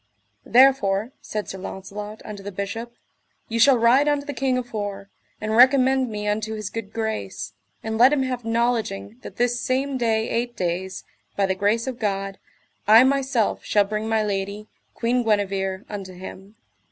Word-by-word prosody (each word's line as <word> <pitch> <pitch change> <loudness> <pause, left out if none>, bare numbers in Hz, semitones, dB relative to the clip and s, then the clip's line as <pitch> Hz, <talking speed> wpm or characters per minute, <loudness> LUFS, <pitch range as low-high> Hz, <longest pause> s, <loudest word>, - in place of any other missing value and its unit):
Therefore, 240 -4 +4
said 210 -1 -4
Sir 190 - -7
Launcelot 205 +3 -7
unto 210 -2 -7
the 205 +1 -6
Bishop, 215 +5 -5 0.5
ye 230 0 -2
shall 270 +2 +6
ride 245 +5 +4
unto 290 -1 +1
the 290 - -4
king 260 -1 0
afore, 205 -5 -5 0.3
and 215 +1 -2
recommend 260 +1 +5
me 210 -1 -4
unto 215 +1 -1
his 215 -2 -5
good 225 -3 -6
grace, 220 - -4 0.3
and 220 0 -3
let 250 +3 +7
him 285 -3 +2
have 250 -2 -3
knowledging 225 - -1
that - - -10
this 245 0 +1
same 265 +2 -1
day 225 -2 +1
eight 240 +1 -2
days, 185 +2 -3 0.3
by 200 - +2
the 190 - +1
grace 205 +4 +1
of 255 -2 -5
God, 195 -3 -2 0.5
I 220 +3 +9
myself 265 -4 +1
shall 205 - +3
bring 215 +2 -3
my 220 -1 +2
lady, 200 +1 -3 0.3
Queen 245 +2 +1
Guenever, 195 -3 0
unto 195 -3 -7
him. 190 +3 -10
220 Hz, 165 wpm, -23 LUFS, 200-245 Hz, 0.5 s, I